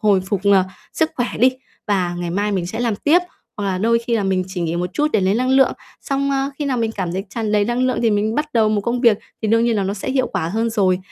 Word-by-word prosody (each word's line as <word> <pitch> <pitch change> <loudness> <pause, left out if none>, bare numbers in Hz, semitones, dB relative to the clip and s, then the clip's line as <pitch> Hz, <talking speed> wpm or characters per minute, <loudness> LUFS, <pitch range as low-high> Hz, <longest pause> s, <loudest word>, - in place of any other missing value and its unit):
hồi 205 -4 +3
phục, 190 +1 -2
ờ, 195 -2 +5 0.3
sức 320 -1 +1
khỏe 245 -1 0
đi, 255 +3 +5 0.4
và 185 -4 0
ngày 175 -1 -3
mai 205 +3 -1
mình 180 -3 -1
sẽ 210 - -4
làm 230 -4 0
tiếp." 310 - +4 0.4
Hoặc 205 - -3
là 185 -2 -1
"Đôi 230 +3 +3
khi 235 0 -1
là 210 - 0
mình 190 -1 +1
chỉ 185 -1 -5
nghỉ 170 0 -1
một 180 +1 -2
chút 300 +8 +1
để 210 - +3
lấy 190 +2 +2
năng 255 +2 0
lượng." 265 0 +4 0.3
Xong: 275 0 -1
"A, 275 0 0
khi 295 - -2
nào 270 -3 0
mình 225 -1 0
cảm 180 -5 -3
thấy 190 +2 -3
tràn 215 -1 -2
đầy 210 -1 +3
năng 240 +3 -1
lượng 255 - 0
thì 225 - +3
mình 210 +2 0
bắt 300 0 -2
đầu 220 -2 +3
một 210 -1 +1
công 235 +4 -1
việc, 230 -5 +4 0.2
thì 215 - 0
đương 230 +1 +3
nhiên 235 -2 +1
là 200 - +1
nó 195 +1 -2
sẽ 215 +6 -4
hiệu 260 -1 +1
quả 160 - -2
hơn 225 +4 -1
rồi." 190 -4 +2
215 Hz, 295 wpm, -20 LUFS, 190-240 Hz, 0.4 s, ờ